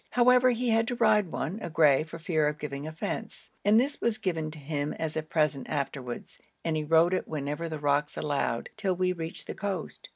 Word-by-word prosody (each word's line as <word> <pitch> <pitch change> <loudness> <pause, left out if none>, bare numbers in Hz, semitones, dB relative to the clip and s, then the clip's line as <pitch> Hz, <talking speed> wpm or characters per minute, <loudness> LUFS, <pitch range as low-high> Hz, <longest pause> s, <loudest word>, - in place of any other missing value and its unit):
However, 250 +1 +5
he 245 0 0
had 225 0 +3
to 245 - -1
ride 215 -6 +3
one, 190 +8 -3
a 175 - -4
grey, 155 -4 +5
for 160 +1 -7
fear 160 -2 +1
of 150 0 -1
giving 145 0 -5
offence, 160 +1 -5
and 210 +2 +6
this 280 +4 -1
was 235 -1 +1
given 165 -8 -2
to 155 - -10
him 145 0 -3
as 160 -1 -4
a 155 - 0
present 150 -3 0
afterwards, 135 -4 -4 0.3
and 165 -1 +1
he 155 - 0
rode 165 +3 +4
it 185 - -1
whenever 150 +2 -3
the 155 - -4
rocks 145 0 0
allowed 145 -5 -1
till 195 -4 0
we 180 0 +1
reached 165 -1 -5
the - - -5
coast. 195 -4 -4
160 Hz, 215 wpm, -28 LUFS, 150-200 Hz, 0.3 s, and